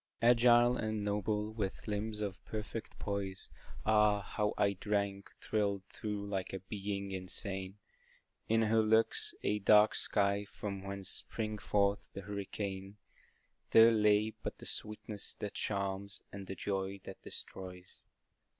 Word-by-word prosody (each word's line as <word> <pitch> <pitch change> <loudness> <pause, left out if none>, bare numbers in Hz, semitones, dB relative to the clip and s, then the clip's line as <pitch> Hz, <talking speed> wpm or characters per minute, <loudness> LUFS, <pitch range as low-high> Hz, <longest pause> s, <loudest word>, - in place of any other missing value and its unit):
Agile 120 +1 +6
and 110 -2 -2
noble, 105 +1 0
with 105 -2 -3
limbs 105 +1 -2
of 95 -2 -4
perfect 110 +1 -5
poise, 100 -2 -4 0.4
Ah, 105 -1 +5
how 105 +1 -1
I 100 -1 +3
drank, 100 0 -1
thrilled 100 -3 0
through 105 -1 -4
like 95 -2 -3
a 95 - -2
Being 100 0 -4
insane, 95 +1 -4 0.7
In 115 0 +4
her 110 0 +4
look, 110 +1 +4 0.3
a 105 - +1
dark 105 +1 +6
sky, 100 0 +2
from 100 -1 -5
whence 100 -1 -4
springs 110 -2 -3
forth 100 -1 +1
the 100 - -5
hurricane, 100 0 -5 0.7
There 115 +1 +8
lay 105 0 +4
but - - -4
the - - -11
sweetness 105 -1 -4
that 105 - -5
charms, 100 -1 -3
and 100 -1 -7
the 95 - -4
joy 95 +1 -2
that - - -9
destroys. 90 -1 -8
100 Hz, 135 wpm, -34 LUFS, 100-105 Hz, 0.7 s, There